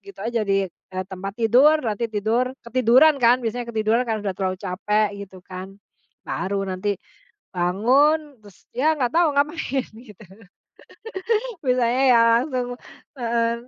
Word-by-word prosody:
gitu 395 - -14
aja 235 -1 -1
di, 195 -1 +1
e 185 - -16
tempat 195 +2 -7
tidur, 250 +7 +5
nanti 225 +1 -2
tidur, 220 +3 0 0.2
ketiduran 255 +5 +4
kan, 240 +1 +5
biasanya 235 +1 -3
ketiduran 220 +1 +1
karena 215 -2 -2
sudah 190 -2 -3
terlalu 185 -1 -1
capek, 210 +3 0
gitu 190 -1 -10
kan. 190 +1 -9 0.5
Baru 195 +1 -2
nanti, 195 +1 -2 0.5
bangun, 260 - +1
terus, 205 -4 -19
ya 305 +5 +1
nggak 255 -5 -1
tahu 340 0 +3
ngapain, 285 -2 -1
gitu. 215 -4 -15 1.4
Biasanya 250 -2 +1
ya 230 - +5 0.2
langsung 255 -3 -2 0.5
mhm. 230 0 0
230 Hz, 135 wpm, -22 LUFS, 200-255 Hz, 1.4 s, tidur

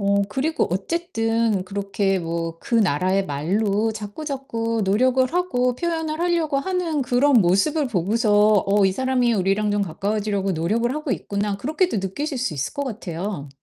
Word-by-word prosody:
어 200 0 +2
그리고 275 +9 0
어쨌든 225 - 0
그렇게 195 0 -1
뭐 165 -1 -4
그 - - -4
나라의 190 -1 +2
말로 200 +9 0
자꾸자꾸 230 +1 -4
노력을 255 +7 +3
하고 250 -9 +1
표현을 320 +1 -2
하려고 335 -4 +1
하는 340 -2 -1
그런 260 +3 +2
모습을 250 - +2
보고서 210 +1 +3
'어 200 0 +3
이 190 - +1
사람이 250 +1 +1
우리랑 200 +2 +1
좀 205 0 +1
가까워지려고 200 +2 -1
노력을 215 +9 0
하고 305 -3 -2
있구나.' 200 -2 -2
그렇게도 310 - 0
느끼실 255 +10 -3
수 245 -10 -2
있을 140 0 -3
것 285 - -3
같아요. 190 - -5
215 Hz, 350 characters per minute, -22 LUFS, 195-270 Hz, -, 노력을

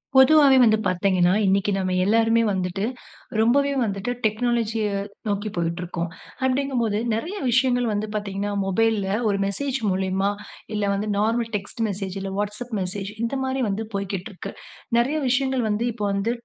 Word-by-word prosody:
பொதுவாவே 275 0 +7
வந்து 220 -2 +5
பார்த்தீங்கன்னா, 180 -1 +2
இன்னைக்கு 195 +1 +2
நம்ம 185 -1 -1
எல்லோருமே 225 +2 +3
வந்துட்டு 185 +1 -1 0.5
ரொம்பவே 280 +5 +3
வந்துட்டு 200 +2 -2
டெக்னாலஜிய 225 0 0 0.4
நோக்கி 205 +1 -1
போயிட்டு 170 0 -1
இருக்கோம். 175 -1 -3 0.4
அப்டிங்கபோது 255 -5 0
நெறைய 320 - -3
விஷயங்கள் 245 0 +2
வந்து 205 +1 -1
பார்த்தீங்கன்னா, 205 0 -2
மொபைல்ல 210 +1 +1 0.2
ஒரு 200 -1 +1
மெசேஜ் 265 +7 -2
மூலியமா 190 +1 0 0.5
இல்ல 210 - -1
வந்து 200 +2 -2
நார்மல் 225 +2 +1
டெக்ஸ்ட் 205 +3 -5
மெசேஜ், 195 -1 -4
இல்ல 195 - -4
Whatsapp 210 +4 -4
மெசேஜ் 195 +2 -4
இந்த 235 +4 -1
மாரி 265 0 -1
வந்து 205 +2 -2
போய்க்கிட்டு 195 0 -3
இருக்கு. 185 - -7 0.5
நெறைய 260 +6 +2
விஷயங்கள் 260 0 +1
வந்து 210 +2 0
இப்போ 210 -2 -3
வந்து 200 +4 0
210 Hz, 145 wpm, -24 LUFS, 195-240 Hz, 0.5 s, பொதுவாவே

